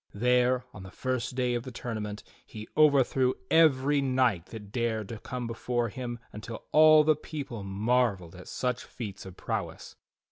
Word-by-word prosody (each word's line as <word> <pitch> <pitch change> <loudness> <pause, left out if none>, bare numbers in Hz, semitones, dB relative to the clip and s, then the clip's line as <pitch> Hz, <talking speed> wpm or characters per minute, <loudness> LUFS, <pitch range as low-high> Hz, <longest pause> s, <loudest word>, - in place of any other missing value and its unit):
There, 125 +2 +2
on 95 - -10
the 95 - -9
first 130 +4 -3
day 125 -1 0
of 120 - -1
the 130 - -8
tournament, 110 -4 -5 0.2
he 110 0 -10
overthrew 135 -4 +4 0.2
every 145 -3 +4
knight 125 -9 +1
that 105 -3 -10
dared 110 -4 -1
to 115 - -6
come 125 +2 -5
before 115 +1 -2
him 120 +2 -5 0.2
until 110 +2 -8
all 155 0 +7
the 155 0 +4
people 140 -7 -6
marvelled 100 -2 0
at 90 0 -12
such 125 -1 -2
feats 105 -5 -8
of 95 - -11
prowess. - - -5
120 Hz, 165 wpm, -28 LUFS, 105-130 Hz, 0.2 s, all